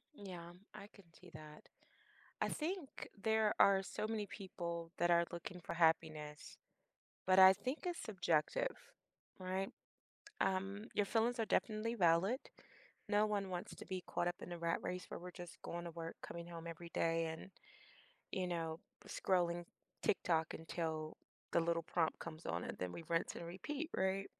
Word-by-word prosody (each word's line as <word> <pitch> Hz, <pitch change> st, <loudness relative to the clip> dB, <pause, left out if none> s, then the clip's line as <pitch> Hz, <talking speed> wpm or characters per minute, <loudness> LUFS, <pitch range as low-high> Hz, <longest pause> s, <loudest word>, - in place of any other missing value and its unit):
Yeah, 180 Hz, -6 st, -7 dB, 0.2 s
I 205 Hz, -1 st, -8 dB
could 200 Hz, -4 st, -16 dB
see 180 Hz, -, -13 dB
that. 155 Hz, -1 st, -11 dB, 0.7 s
I -, -, +3 dB
think 325 Hz, -2 st, -3 dB
there 220 Hz, -1 st, +4 dB
are 195 Hz, -1 st, +7 dB
so 215 Hz, -, -3 dB
many 215 Hz, -2 st, -1 dB
people 170 Hz, -4 st, -4 dB
that 175 Hz, +1 st, +3 dB
are 170 Hz, 0 st, +6 dB
looking 175 Hz, +1 st, -6 dB
for -, -, -3 dB
happiness, 160 Hz, -3 st, +1 dB, 0.7 s
but 185 Hz, 0 st, +6 dB
I 190 Hz, 0 st, +11 dB
think 250 Hz, -, -2 dB
it's 350 Hz, -1 st, -1 dB
subjective, 195 Hz, -, +1 dB, 0.6 s
right? 185 Hz, +1 st, -1 dB, 0.7 s
Um, 195 Hz, +2 st, +1 dB
your 205 Hz, -, +3 dB
feelings 230 Hz, +3 st, +2 dB
are 225 Hz, -, +3 dB
definitely 225 Hz, +2 st, +1 dB
valid. 185 Hz, +6 st, +4 dB, 0.7 s
No 205 Hz, 0 st, +4 dB
one 205 Hz, -2 st, 0 dB
wants 180 Hz, -1 st, -4 dB
to -, -, -9 dB
be 185 Hz, -2 st, -3 dB
caught 175 Hz, -, 0 dB
up 175 Hz, -, 0 dB
in 180 Hz, -, -6 dB
a 175 Hz, -, -3 dB
rat 170 Hz, 0 st, +1 dB
race 180 Hz, 0 st, -2 dB
where -, -, -5 dB
we're 180 Hz, +1 st, -7 dB
just 175 Hz, 0 st, -8 dB
going 175 Hz, 0 st, -4 dB
to 170 Hz, -, -4 dB
work, 165 Hz, 0 st, -6 dB
coming 170 Hz, 0 st, -6 dB
home 170 Hz, -1 st, -6 dB
every 170 Hz, 0 st, -7 dB
day, 165 Hz, 0 st, +2 dB
and, 160 Hz, +4 st, -6 dB, 0.8 s
you 185 Hz, -1 st, 0 dB
know, 165 Hz, -2 st, -2 dB, 0.3 s
scrolling 175 Hz, -2 st, +2 dB, 0.4 s
TikTok 165 Hz, -4 st, +2 dB
until 160 Hz, -1 st, -3 dB, 0.4 s
the 170 Hz, -, +5 dB
little 165 Hz, 0 st, +1 dB
prompt 165 Hz, 0 st, +1 dB
comes 165 Hz, 0 st, -7 dB
on, 85 Hz, +1 st, -1 dB
and -, -, -5 dB
then 90 Hz, -1 st, -2 dB
we 165 Hz, -, -7 dB
rinse 165 Hz, 0 st, +1 dB
and 170 Hz, -, -5 dB
repeat, 280 Hz, -, -4 dB
right? 190 Hz, +1 st, +1 dB
175 Hz, 165 wpm, -39 LUFS, 165-200 Hz, 0.8 s, I